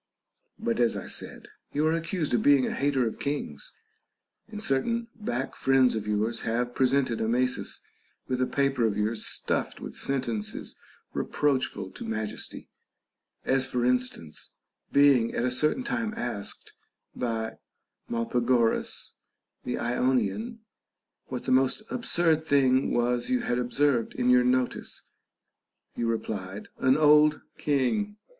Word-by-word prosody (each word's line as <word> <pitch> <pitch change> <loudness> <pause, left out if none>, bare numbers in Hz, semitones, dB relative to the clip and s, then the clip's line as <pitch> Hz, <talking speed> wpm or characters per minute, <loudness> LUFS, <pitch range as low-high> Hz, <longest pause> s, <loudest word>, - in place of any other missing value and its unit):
But, 115 - -1
as 120 -2 +3
I - - -6
said, - - -4 0.3
you 150 +2 +1
are 160 - +3
accused 165 -2 -2
of 120 - +3
being 140 -3 +5
a - - -2
hater 140 -3 +1
of 110 - -4
kings, 140 - -4 0.8
and 220 -2 -7
certain 230 - 0
back 135 - -3
friends 135 -1 +4
of 105 -1 -3
yours 110 +2 0
have 120 +2 -1
presented 130 -3 +1
Amasis 125 +3 0 0.5
with 130 0 -1
a 130 - +2
paper 140 -3 +1
of 105 -2 -2
yours 110 +2 0
stuffed - - -1
with - - -8
sentences 120 -6 -3 0.4
reproachful 130 -9 -1
to - - -9
majesty; 110 -1 -4 0.8
as 130 0 +2
for 125 -2 -1
instance, 125 -11 -1 0.4
being 140 -5 +4
at 120 - 0
a 125 - +1
certain 150 - +1
time 230 -5 -2
asked 110 -5 -4 0.4
by 115 -2 -2 0.5
Molpagoras 120 0 +1 0.5
the 125 - -2
Ionian, 130 - 0 0.7
what 125 -1 -5
the - - -1
most 130 +10 +3
absurd 170 -9 +2
thing 135 -3 +3
was 120 0 +1
you 255 -1 +2
had 120 0 0
observed 125 -1 +1
in 125 0 +2
your 125 0 +6
notice, 125 0 -1 0.9
you 120 - -1
replied, 105 -4 -4
An 130 +2 +4
old 150 0 +5 0.2
king. 180 - 0
130 Hz, 135 wpm, -27 LUFS, 120-145 Hz, 0.9 s, your